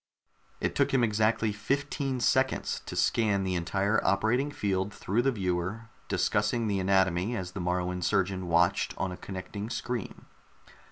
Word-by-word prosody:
It - - -1
took - - +2
him 125 - +4
exactly 110 0 +2
fifteen 135 +5 -2
seconds 130 +2 +1
to - - -5
scan 105 -4 +2
the 95 -1 -1
entire 95 +5 +1
operating 110 +8 +2
field 100 -7 -1
through 105 +3 -1
the 135 +2 +2
viewer, 95 +1 -2 0.2
discussing 120 -2 +1
the 100 -2 0
anatomy 95 +3 +2
as 90 -3 -5
the 95 - -5
Moruan 90 0 -1
surgeon 95 0 0
watched 85 +3 +2
on 95 - -1
a 90 - -7
connecting 100 +3 -6
screen. 120 -3 -4
100 Hz, 150 wpm, -29 LUFS, 95-115 Hz, 0.2 s, him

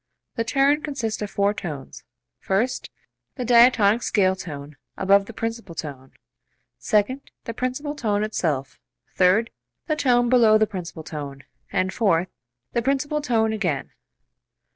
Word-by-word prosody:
The 230 - -1
turn 275 +5 +2
consists 260 -9 -3
of 210 - -3
four 200 +1 +1
tones; 140 -8 -7 0.4
first, 220 +7 -1 0.5
the 250 - -4
diatonic 235 -2 +5
scale 190 -4 +2
tone 150 -5 -8 0.2
above 195 +1 +4
the - - -7
principal 225 -5 -5
tone; 135 -4 -7 0.7
second, 240 +6 0
the 230 - -5
principal 255 +5 -3
tone 210 -7 0
itself; 150 -11 -2 0.3
third, 190 +5 +3 0.3
the 310 - 0
tone 245 -5 +3
below 230 -3 +6
the 215 - +3
principal 175 -5 -7
tone; 145 -3 -7 0.3
and 185 +1 0
fourth, 185 -5 +2 0.4
the 235 - +1
principal 280 +3 0
tone 225 -5 +1
again. 180 -10 -2
215 Hz, 135 wpm, -23 LUFS, 180-245 Hz, 0.7 s, below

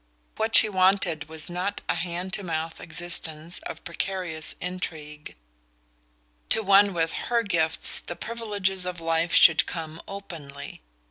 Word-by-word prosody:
What 220 +1 +1
she 220 - +9
wanted 185 -5 +1
was 160 -1 -3
not 180 +3 -4
a - - +1
hand 175 +2 -4
to 210 - +1
mouth 165 -3 -5
existence 165 -1 -2
of - - -9
precarious 175 -2 -1
intrigue: 155 -4 -7 1.1
to 220 - +5
one 200 0 +5
with 165 -1 -1 0.2
her 235 -1 +1
gifts 165 -6 +4
the 175 - -7
privileges 205 -5 -3
of 180 -1 -5
life 165 +1 0
should 160 - +6
come 160 -1 -6
openly. 155 - -9
175 Hz, 135 wpm, -25 LUFS, 160-195 Hz, 1.1 s, she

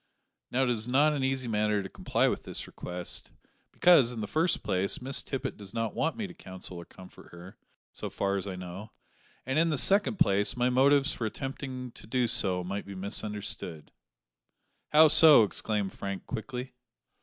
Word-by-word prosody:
Now, 130 +2 +1
it 125 - +1
is 110 -1 -3
not 145 +5 +3
an 140 -3 -2
easy 130 -1 -1
matter 105 -2 0
to - - -6
comply - - 0
with - - -1
this - - -4
request, 90 0 -5 0.4
because, 160 -9 +5
in 120 - -6
the 105 - -3
first 160 - 0
place, 95 +1 0
Miss 130 +1 0
Tippet 135 - -5
does 100 +1 -9
not 115 -2 -2
want 160 - -1
me 220 - -3
to 180 - -9
counsel 95 - -7
or 85 - -9
comfort 95 -1 -15
her, 85 +2 -12 0.4
so - - -6
far 100 0 -1
as 100 0 -3
I 95 - -5
know; 90 +4 -9 0.5
and, 135 +4 0
in 165 +1 +3
the 155 - 0
second 200 - +4
place, 100 - +2
my 125 +1 +2
motives 140 +3 +3
for 115 - -3
attempting 130 0 -6
to 105 - -14
do 125 +1 +1
so 95 -6 +2
might 100 +3 -5
be 100 - -8
misunderstood." 100 -4 -4 1.0
"How 155 +1 +7
so?" 155 -5 +7
exclaimed 105 -1 -2
Frank 100 -1 -6
quickly. 125 +3 -6
115 Hz, 185 wpm, -29 LUFS, 100-135 Hz, 1.0 s, How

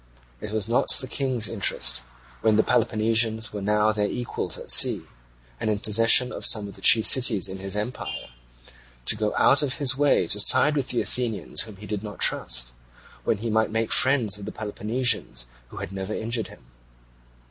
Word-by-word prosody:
It 105 - -7
was 110 -1 -3
not 115 - 0
the - - -2
King's 130 -5 0
interest, 100 - 0 0.4
when 110 -1 +2
the 110 - +3
Peloponnesians 110 -1 0
were 105 - -6
now 105 +2 +1
their 105 -1 -1
equals 120 +3 -4
at - - -1
sea, - - +4 0.6
and 110 - -3
in 105 - 0
possession 115 +4 +3
of - - -7
some 105 -3 +4
of 100 - -12
the - - -14
chief 110 -1 +5
cities 115 -7 +5
in 95 0 -8
his 95 +1 -6
empire, 105 +4 -5 0.8
to - - +2
go 105 -1 -2
out 140 - +4
of 140 -4 -2
his 135 -2 +1
way 145 -9 +2
to 105 - 0
side 130 +8 +5
with 135 -3 -2
the 120 - -1
Athenians 120 -4 -3
whom 110 -3 -8
he 100 +2 -12
did 105 -1 -5
not 105 -1 -9
trust, - - -1 0.5
when 110 - 0
he 115 +2 -4
might 110 +1 +1
make 110 +1 -3
friends 120 -7 +2
of 100 - -9
the 105 - -6
Peloponnesians 110 - -2 0.2
who - - -14
had - - -7
never 95 +2 -6
injured 115 0 -3
him. - - -17
110 Hz, 190 wpm, -24 LUFS, 105-120 Hz, 0.8 s, chief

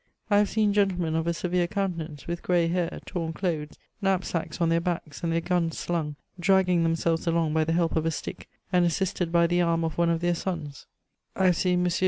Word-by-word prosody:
I 205 - +6
have 210 - +2
seen 215 -2 +2
gentlemen 185 -5 +1
of 165 +1 0
a 170 - +2
severe 180 0 0
conn 195 0 -1
t^oance, 155 -4 -7
with 170 0 -4
gray 175 -2 +2
hair, 175 0 -1
torn 165 -3 -3
dothes, 155 -4 -3 0.2
knapsacks 185 -4 -1
on 170 -1 +2
their 165 0 +2
backs^ 165 -4 -3
and 170 - -1
their 165 0 +1
guns 175 -1 0
slung, 160 -4 -2 0.2
dragging 180 -1 +3
themselves 165 0 0
along 165 -2 +1
by 160 0 +2
the 165 - 0
bdp 170 -1 +1
of 160 0 +1
a - - +3
stick, 160 - -6 0.2
and 180 -1 +5
assist^ 175 0 0
by 170 0 +4
tiie 175 +1 +2
arm 165 -1 +1
ci 160 - -4
one 170 0 +3
of 165 0 0
their 175 0 +2
sons; 160 -6 -5 0.5
I 190 - +1
have 180 -1 +5
seen 180 0 +1
M. 180 - +1
170 Hz, 225 wpm, -27 LUFS, 165-180 Hz, 0.5 s, I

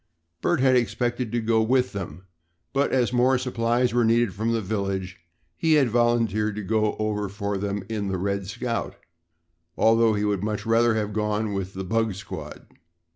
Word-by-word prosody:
Bert - - +1
had 130 -1 +4
expected 120 0 0
to 120 - 0
go 110 0 +2
with 125 +3 +1
them, 90 -2 -6 0.5
but, 140 +1 +1
as 125 -2 +1
more 125 +2 +4
supplies 120 -1 0
were 120 0 +3
needed 115 -2 +2
from 110 +5 -1
the 115 - +1
village, 95 -3 -3 0.4
he 160 - +2
had 140 -5 +4
volunteered 115 -3 +1
to 105 - -4
go 110 +1 +1
over 105 -2 -1
for 100 0 -3
them 100 0 -3
in 105 -3 -3
the 95 -1 -1
"Red 100 +1 -2
Scout," 115 +2 -3 0.8
although 115 -1 +4
he 105 0 0
would 100 -3 0
much 105 -1 -2
rather 115 0 +3
have 105 -1 -2
gone 105 0 -1
with 95 -1 -4
the 95 - -4
"bug 110 +1 0
squad." 95 +1 -8
110 Hz, 180 wpm, -25 LUFS, 100-120 Hz, 0.8 s, had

